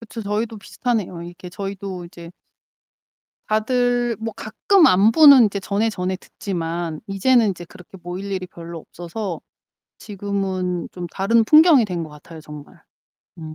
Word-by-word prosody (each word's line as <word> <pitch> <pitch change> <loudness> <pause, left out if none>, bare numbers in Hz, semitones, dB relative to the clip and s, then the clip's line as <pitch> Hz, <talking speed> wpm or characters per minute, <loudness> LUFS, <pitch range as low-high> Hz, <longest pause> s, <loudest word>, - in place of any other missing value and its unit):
그쵸 230 0 -9
저희도 215 +2 -3
비슷하네요. 205 -5 -3
이렇게 175 +1 -10
저희도 195 -1 -6
이제 170 0 -12 1.2
다들 245 +2 +1
뭐 225 0 -4
가끔 325 - +2
안부는 235 +8 +7
인제 200 -1 -1
전해 205 +3 0
전해 185 -2 -3
듣지만 170 -4 -5
이제는 220 +3 +3
이제 175 -2 -7
그렇게 180 +2 -15
모일 185 +3 -6
일이 185 -2 -3
별로 170 -1 -9
없어서 175 +2 -7 0.6
지금은 190 -3 -3
좀 180 -1 -6
다른 225 +6 +2
풍경이 305 -1 +6
된 180 -4 -4
것 160 - -7
같아요, 155 +2 -13
정말. 150 -1 -13 0.6
음. 155 -1 -8
195 Hz, 305 characters per minute, -21 LUFS, 175-225 Hz, 1.2 s, 안부는